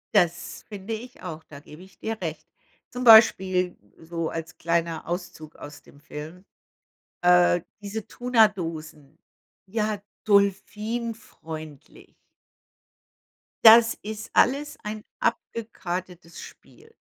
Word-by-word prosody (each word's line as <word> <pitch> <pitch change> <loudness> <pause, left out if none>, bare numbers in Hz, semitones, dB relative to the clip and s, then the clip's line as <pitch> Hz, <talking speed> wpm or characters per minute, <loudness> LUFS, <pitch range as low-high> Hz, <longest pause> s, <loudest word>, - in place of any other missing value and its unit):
Das 175 0 +1
finde 205 +1 -6
ich 245 +3 -8
auch, 160 -3 -7
da 140 - -12
gebe 150 +3 -13
ich 190 - -19
dir 225 0 -4
recht. 160 -3 -5 0.4
Zum 250 0 -5
Beispiel 190 -5 +6 0.2
so 165 0 -4
als 165 0 -7
kleiner 165 -1 -1
Auszug 175 -3 -6
aus 145 0 -11
dem 140 - -19
Film. 155 +3 -9 0.8
Äh, 175 0 +5 0.2
diese 205 +1 -5
Tuna-Dosen, 165 - 0 0.5
ja, 210 0 -2 0.2
delfin-freundlich. 200 - -2 1.5
Das 225 0 +8
ist 215 +1 -7
alles 290 +3 +2
ein 210 0 -6 0.2
abgekartetes 180 -6 -4
Spiel. 450 0 -15
185 Hz, 100 wpm, -25 LUFS, 165-220 Hz, 1.5 s, Das